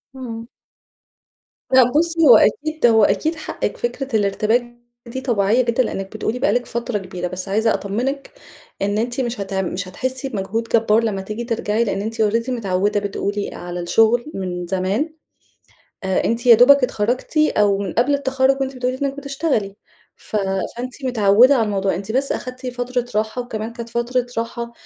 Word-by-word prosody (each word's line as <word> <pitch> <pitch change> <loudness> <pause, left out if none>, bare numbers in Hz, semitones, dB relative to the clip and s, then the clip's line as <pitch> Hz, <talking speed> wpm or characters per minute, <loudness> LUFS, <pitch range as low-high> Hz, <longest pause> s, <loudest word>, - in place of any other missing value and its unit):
إمم. 230 -3 -7 1.3
لأ 260 0 +8
بصي، 330 +2 +3
هو - - +10
أكيد 310 - +1
هو 225 -2 +5
أكيد 210 - +1
حقِك 320 - -4
فكرة 275 - -3
الارتباك 220 +4 0 0.3
دي 260 +3 -5
طبيعية 230 -2 +2
جدًا 235 +1 +1
لإنِك 195 -3 -5
بتقولي 225 +3 -2
بقى 280 - +2
لك 245 0 0
فترة 235 -1 -3
كبيرة، 185 -2 -5
بس 185 +2 -5
عايزة 220 +3 +2
أطمنِك 255 +8 -3 0.5
إن 205 +1 0
أنتِ 240 +4 -1
مش 240 -2 -3
هتع 195 -1 -2
مش 185 +1 -4
هتحسي 260 +7 -4
بمجهود 210 0 -2
جبار 225 -1 +2
لما 205 -4 -1
تيجي 215 +4 -5
ترجعي 230 -1 0
لإن 200 -3 -2
أنتِ 225 +2 -3
already 230 +3 +1
متعودة 205 -4 0
بتقولي 205 0 -3
على 175 0 -6
الشغل 225 - +2
من 180 -2 -4
زمان، 195 - -1 0.9
أ 190 -1 0
أنتِ 230 +1 -1
يا 240 -2 +9
دوبك 270 +4 +6
اتخرجتِ 245 +5 -1
أو 210 -10 +3
من 195 -3 -4
قبل 250 +5 +2
التخرُّج 270 -1 +1
وأنتِ 270 0 -2
بتقولي 255 0 -2
إنِك 275 0 -1
بتشتغلي، 275 -8 -2 0.4
ف - - -9
فأنتِ 220 +7 -3
متعودة 240 +2 +5
على 230 -4 +2
الموضوع، 195 -2 0
أنتِ 200 +2 -5
بس 270 +4 0
اخدتِ 255 +1 -5
فترة 245 0 -2
راحة 220 +3 -1
وكمان 225 -2 -5
كانت 235 -1 -7
فترة 240 +1 -1
راحة 235 +1 -3
230 Hz, 165 wpm, -20 LUFS, 200-255 Hz, 1.3 s, هو